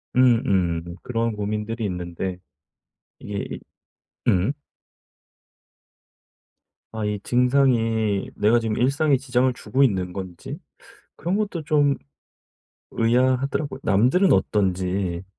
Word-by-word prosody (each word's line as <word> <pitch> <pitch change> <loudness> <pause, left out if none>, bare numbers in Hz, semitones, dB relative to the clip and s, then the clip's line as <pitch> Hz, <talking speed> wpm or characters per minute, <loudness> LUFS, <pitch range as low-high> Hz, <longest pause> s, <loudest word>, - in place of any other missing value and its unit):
음음 95 -9 +2
그런 115 -1 -1
고민들이 105 +2 -3
있는데 90 0 -4 0.8
이게 100 -1 -5 0.7
음. 95 +7 +3 2.4
아 110 -1 -3
이 105 -1 -2
증상이 120 -5 +2
내가 110 +3 +3
지금 110 -2 -2
일상에 140 +4 +2
지장을 130 -1 +1
주고 130 +3 0
있는 95 -8 +1
건지 90 -2 -7 0.6
그런 175 +4 -1
것도 200 -6 -2
좀 145 -2 +3 1.0
의아하더라고요. 130 +4 +1
남들은 125 - +3
어떤지 95 -2 0
115 Hz, 205 characters per minute, -23 LUFS, 95-130 Hz, 2.4 s, 음